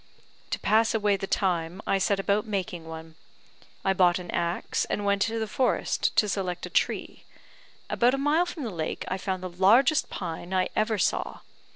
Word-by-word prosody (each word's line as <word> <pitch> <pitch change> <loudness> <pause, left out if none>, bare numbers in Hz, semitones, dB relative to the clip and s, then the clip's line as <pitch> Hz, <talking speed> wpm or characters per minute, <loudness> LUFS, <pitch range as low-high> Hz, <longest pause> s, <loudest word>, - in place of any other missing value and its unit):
To - - -1
pass 225 +1 +2
away 205 -2 +2
the 195 0 -4
time, 175 -2 0
I 195 - +1
set 195 +1 +1
about 205 +3 0
making 180 -5 -3
one. 160 0 -9 0.7
I 195 - +3
bought 180 -2 +4
an 180 -1 -7
axe, 170 +1 -1
and 205 - -3
went 200 0 +1
to 225 +3 +1
the 220 - -1
forest 250 +4 0
to 210 - +4
select 185 -3 -2
a - - -9
tree. - - -1 0.6
About 245 +2 +2
a - - -3
mile 300 +6 +2
from 325 -4 -6
the 230 - -3
lake, 160 -3 -4
I 185 - -2
found 185 -1 -3
the - - -2
largest 220 - +4
pine 175 +3 -5
I 185 0 +1
ever 215 0 +1
saw. 185 - -1
195 Hz, 190 wpm, -27 LUFS, 180-220 Hz, 0.7 s, bought